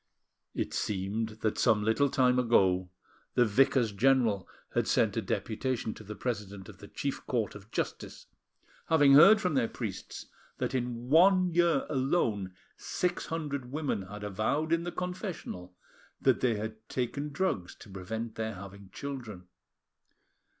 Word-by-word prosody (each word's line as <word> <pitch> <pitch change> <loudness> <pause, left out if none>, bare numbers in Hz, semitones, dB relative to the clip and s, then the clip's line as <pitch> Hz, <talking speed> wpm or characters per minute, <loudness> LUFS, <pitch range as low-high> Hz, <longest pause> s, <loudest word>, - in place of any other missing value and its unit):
It - - -2
seemed 105 +3 -2
that 110 - 0
some 110 -4 +3
little 110 +6 +2
time 125 -1 +3
ago, 95 -7 +3 0.5
the 120 - +5
Vicars 115 +1 +3
General 115 -3 +2 0.3
had - - +1
sent - - +2
a - - 0
deputation 115 0 -2
to - - -12
the 105 +1 -8
president 100 -6 -4
of 95 -3 -13
the 100 - -11
chief 140 +6 -4
court 115 -4 -1
of 105 +1 -12
justice, - - -4 0.6
having 145 -4 +5
heard 195 +10 +9
from 180 -6 0
their 130 -4 +2
priests - - -6 0.3
that - - -2
in 120 -1 -3
one 185 +2 +5
year 170 -4 +3
alone 120 - 0 0.2
six 180 -1 -2
hundred 140 -6 -4
women 150 -8 -1
had 105 +2 -9
avowed 110 - 0
in 165 0 +1
the 175 - -3
confessional 180 - -5 0.4
that - - +3
they 120 -3 +2
had 110 +1 -6
taken 140 +4 -2
drugs 140 - -2
to - - -14
prevent 110 +4 -5
their 110 -1 -4
having 100 +1 -11
children. 120 -10 -7
120 Hz, 150 wpm, -30 LUFS, 105-140 Hz, 0.6 s, heard